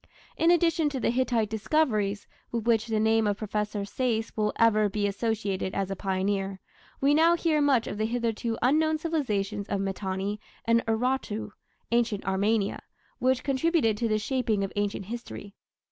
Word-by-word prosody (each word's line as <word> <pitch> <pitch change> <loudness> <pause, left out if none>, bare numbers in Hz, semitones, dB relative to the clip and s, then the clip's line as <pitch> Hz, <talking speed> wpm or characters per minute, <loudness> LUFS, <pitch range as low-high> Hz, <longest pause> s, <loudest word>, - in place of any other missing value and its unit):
In 330 - +3
addition 335 -2 +3
to 275 -2 -4
the - - +1
Hittite 240 -4 0
discoveries, 215 -3 0 0.3
with 230 -2 -2
which 230 -1 +2
the 220 -1 0
name 220 0 +3
of 205 -1 0
Professor 210 -1 -2
Sayce 225 +1 -2
will 210 -1 +1
ever 215 -2 +4
be 205 +1 -1
associated 200 -2 -2
as 195 -1 -1
a - - -2
pioneer, 195 0 -1 0.4
we 280 +2 +3
now 330 +3 +5
hear 320 -3 +1
much 270 -5 +3
of 205 - -5
the 215 - +1
hitherto 230 -1 -2
unknown 310 +4 +3
civilizations 215 - -2
of 200 - 0
Mitanni 195 +1 -3 0.2
and 230 0 +3
Urartu 225 -2 -1 0.4
(ancient 235 -3 +1
Armenia), 200 +2 0 0.4
which 255 0 +1
contributed 275 -4 +2
to 230 - 0
the 215 -1 +1
shaping 225 -3 0
of 195 - -4
ancient 205 -1 -2
history. 225 -2 -7
220 Hz, 160 wpm, -27 LUFS, 205-255 Hz, 0.4 s, now